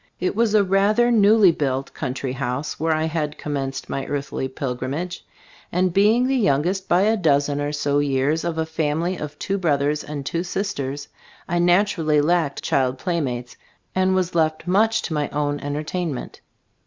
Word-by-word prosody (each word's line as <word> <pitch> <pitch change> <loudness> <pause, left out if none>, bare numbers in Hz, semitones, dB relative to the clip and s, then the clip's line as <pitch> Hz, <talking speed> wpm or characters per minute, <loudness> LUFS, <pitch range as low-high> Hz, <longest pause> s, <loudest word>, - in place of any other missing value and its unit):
It 180 - -1
was 220 -1 +2
a 210 - +5
rather 205 +5 +3
newly 210 -3 +6
built 135 -3 -2
country 130 -1 -3
house 130 +2 -3
where 160 +1 +1
I 155 - 0
had 155 -2 -2
commenced 135 -2 -4
my 135 - -4
earthly 140 -2 -3
pilgrimage, 135 +6 -4 0.5
and 180 0 +1
being 215 +6 +4
the 270 +1 +1
youngest 190 - +1
by 175 +2 +4
a 215 +3 +3
dozen 145 -6 +1
or 145 0 -1
so 145 -1 0
years, 145 +2 +1
of 170 -1 -2
a 160 - 0
family 160 +3 -1
of 150 0 -7
two 195 0 -2
brothers 150 -3 +1
and 145 -2 -6
two 170 +4 -2
sisters, 145 -8 -3 0.4
I 175 -1 0
naturally 175 -4 +3
lacked 155 -2 +1
child 130 -1 +1
playmates 130 -8 -3 0.4
and 185 0 +2
was 185 -1 0
left 155 -1 0
much 210 +5 +2
to 160 - -3
my 150 -1 -1
own 145 0 -1
entertainment. 150 0 -4
155 Hz, 165 wpm, -22 LUFS, 140-185 Hz, 0.5 s, newly